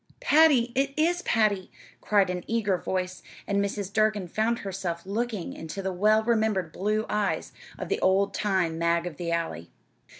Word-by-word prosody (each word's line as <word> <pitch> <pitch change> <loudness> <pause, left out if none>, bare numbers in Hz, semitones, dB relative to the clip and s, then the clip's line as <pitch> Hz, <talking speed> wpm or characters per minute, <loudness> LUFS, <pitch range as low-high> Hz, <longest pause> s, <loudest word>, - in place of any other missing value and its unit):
"Patty 305 - +4
it 275 +2 0
is 345 +3 +2
Patty!" 210 - +1 0.3
cried 200 -3 +2
an 180 -1 -4
eager 220 -4 +1
voice, 185 0 -3 0.2
and 200 0 +1
Mrs. 200 -1 -4
Durgin 215 -3 +1
found 220 +6 0
herself 180 -3 -4
looking 215 -1 -3
into 165 +5 -7
the 190 0 -2
well 215 +4 +3
remembered 220 -7 +1
blue 215 +5 -1
eyes 210 -1 -1 0.3
of - - -5
the - - -1
old 195 +1 +2
time 185 -6 0
Mag 170 0 +1
of 170 -5 -6
the 170 -1 -3
Alley. 165 - -3
200 Hz, 165 wpm, -27 LUFS, 180-220 Hz, 0.3 s, Patty